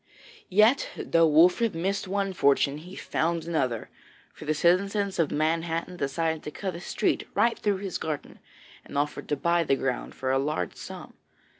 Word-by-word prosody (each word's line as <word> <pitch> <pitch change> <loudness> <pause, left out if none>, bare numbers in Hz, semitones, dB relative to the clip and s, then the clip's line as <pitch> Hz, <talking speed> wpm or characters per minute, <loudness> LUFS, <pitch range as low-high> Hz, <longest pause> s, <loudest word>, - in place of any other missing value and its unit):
Yet, 215 +8 +4
though 165 -1 +3
Wolfert 180 +7 +4
missed 190 +4 -1
one 195 0 -1
fortune, 140 -2 +2
he 180 +4 -11
found 165 -2 -1
another, 130 -9 -1 0.4
for - - -11
the 155 +1 0
citizens 195 +4 +2
of 165 - +3
Manhattan 165 +3 -1
desired 160 +2 -1
to - - -6
cut 190 +4 -4
a 170 - -7
street - - -1
right 235 0 +2
through 205 -2 +1
his 190 -2 -4
garden, 155 -2 -5 0.4
and - - -7
offered 145 +1 -2
to 145 - +2
buy 170 +4 +2
the 135 - +2
ground 135 -1 -3
for 130 0 -2
a 135 - +3
large 135 - -2
sum. - - -9
165 Hz, 170 wpm, -27 LUFS, 150-190 Hz, 0.4 s, Yet